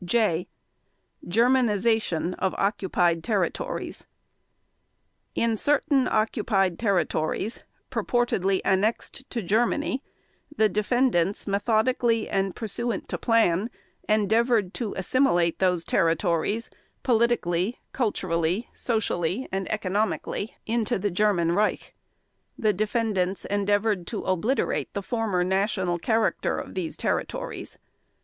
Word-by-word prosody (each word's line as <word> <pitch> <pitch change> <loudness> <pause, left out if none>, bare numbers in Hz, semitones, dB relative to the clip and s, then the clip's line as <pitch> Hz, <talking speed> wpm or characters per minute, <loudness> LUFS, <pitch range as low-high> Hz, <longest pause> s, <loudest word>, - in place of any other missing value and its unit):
(J) 180 -3 +1 0.8
GERMANIZATION 220 -5 +2
OF 190 - 0
OCCUPIED 180 -4 +1
TERRITORIES 215 - -2 1.3
In 230 -1 +1
certain 285 +2 +2
occupied 210 -5 +1
territories 195 0 0 0.3
purportedly 195 -6 +1
annexed 215 +7 0
to 235 -3 -3
Germany 240 - +1 0.6
the 215 -1 +4
defendants 210 -3 +1
methodically 225 +3 +1
and 195 -1 -1
pursuant 230 -1 -3
to - - -3
plan 225 -3 +2 0.4
endeavored 215 -1 +2
to 225 -5 -4
assimilate 185 -5 +2
those 180 -3 +2
territories 170 +6 +1 0.3
politically, 230 -5 +1
culturally, 185 -3 -1
socially, 220 -1 -1
and 190 0 -3
economically 210 +1 -2
into 225 -1 0
the 200 +1 -1
German 180 -3 +2
Reich. 210 +4 0 0.6
The 215 -3 +2
defendants 205 -3 -1
endeavored 205 -2 0
to - - -4
obliterate 190 +9 0
the 200 - -2
former 220 -6 0
national 190 -1 0
character 225 +4 +1
of - - -6
these 175 -4 -3
territories. - - -3
205 Hz, 100 wpm, -26 LUFS, 185-230 Hz, 1.3 s, the